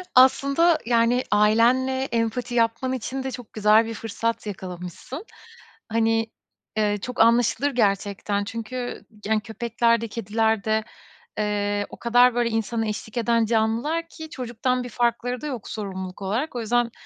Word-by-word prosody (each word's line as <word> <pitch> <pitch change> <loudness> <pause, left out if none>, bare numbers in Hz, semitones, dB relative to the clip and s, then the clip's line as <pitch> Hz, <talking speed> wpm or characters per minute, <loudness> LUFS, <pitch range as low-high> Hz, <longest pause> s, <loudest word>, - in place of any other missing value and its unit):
Aslında 280 +6 +5
yani 235 +1 +3
ailenle 240 +5 +3
empati 240 0 -2
yapman 230 +3 +1
için 260 +2 -4
de 265 - -3
çok 245 -4 -9
güzel 215 +1 +4
bir 225 - -5
fırsat 225 +1 -3
yakalamışsın. 185 - -7 0.6
Hani, 225 0 +2 0.5
eee, 205 -1 +2
çok 250 0 -6
anlaşılır 240 +4 +3
gerçekten. 205 -2 0
Çünkü 230 +3 -5 0.2
yani 215 0 +1
köpekler 230 0 0
de 230 - -3
kediler 220 0 0
de, 220 0 +1 0.6
eee, 205 -1 0
o - - -10
kadar 245 +1 +4
böyle 240 -1 +2
insana 225 0 -1
eşlik 215 +2 -5
eden 230 -1 +2
canlılar 235 +9 0
ki 315 -1 -9
çocuktan 250 -2 -2
bir 245 - -7
farkları 245 +1 -1
da - - -6
yok 250 -7 -5
sorumluluk 190 -3 -6
olarak. 235 +9 -2
O 240 - -2
yüzden 235 +1 +1
230 Hz, 145 wpm, -24 LUFS, 215-250 Hz, 0.6 s, Aslında